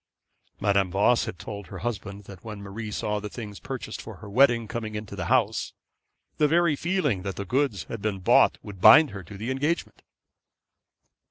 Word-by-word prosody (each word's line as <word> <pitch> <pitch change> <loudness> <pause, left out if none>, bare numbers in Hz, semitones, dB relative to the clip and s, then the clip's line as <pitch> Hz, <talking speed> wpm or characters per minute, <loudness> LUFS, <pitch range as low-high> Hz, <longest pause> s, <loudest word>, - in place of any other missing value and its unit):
Madame 100 -2 +2
Voss 100 +6 +3
had 90 - -6
told 100 +2 -8
her - - -8
husband 100 -3 -4
that 95 -1 -13
when 105 -2 -7
Marie 100 +2 -6
saw 105 0 -2
the 105 0 -6
things 105 -4 -8
purchased - - -6
for - - -9
her - - -12
wedding 120 +1 +3
coming 110 -2 -5
into 105 -1 -6
the 90 -3 -4
house, 115 -3 +1 0.7
the 150 - +5
very 170 0 +3
feeling 155 - 0
that 95 0 -4
the 100 - -5
goods 130 -4 0
had 115 - -7
been 105 -2 -1
bought 95 - +4
would 100 -3 -10
bind 120 +7 +8
her 100 -1 -7
to 95 +3 -11
her 105 - -8
engagement. 145 +6 -2
105 Hz, 185 wpm, -26 LUFS, 100-125 Hz, 0.7 s, bind